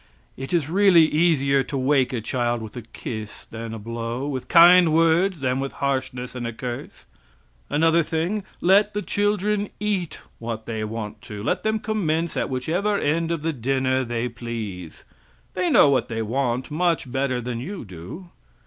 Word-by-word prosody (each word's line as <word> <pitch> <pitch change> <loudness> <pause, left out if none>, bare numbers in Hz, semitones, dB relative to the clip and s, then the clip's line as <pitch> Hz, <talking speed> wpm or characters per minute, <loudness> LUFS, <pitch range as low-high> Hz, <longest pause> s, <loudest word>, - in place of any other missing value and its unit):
It 135 +1 -7
is 165 -6 +1
really 180 -1 +5
easier 150 -4 +2
to 140 - -4
wake 135 0 +2
a 120 -3 -2
child 120 0 -1
with 110 -2 -9
a 120 - -5
kiss 110 -1 -7
than 115 0 -7
a 115 - -5
blow; 115 +4 -4
with 130 -3 -4
kind 175 0 +7
words 165 +2 +3
than 130 -1 0
with 135 0 -3
harshness 130 -2 -2
and 125 -2 -4
a - - -3
curse. 120 +1 -7 0.6
Another 165 +3 +3
thing: 170 +6 -2 0.2
let 200 +3 +4
the 210 - -1
children 205 0 0
eat 200 -5 -2 0.2
what 115 -1 -5
they 110 -2 -3
want 105 -1 -5
to. 105 -1 -6
Let - - 0
them 220 0 0
commence 170 -7 -1
at - - -1
whichever 170 +11 0
end 165 +1 0
of 165 -3 -2
the 165 0 0
dinner 130 +1 0
they 120 0 -2
please. 115 -8 -7 0.5
They 185 -1 0
know 145 - +6
what 135 - +1
they 115 -2 -3
want 125 +3 -1
much 165 -4 0
better 135 -1 0
than 120 -1 -4
you 180 - -6
do. 95 - -10
135 Hz, 175 wpm, -23 LUFS, 120-170 Hz, 0.6 s, kind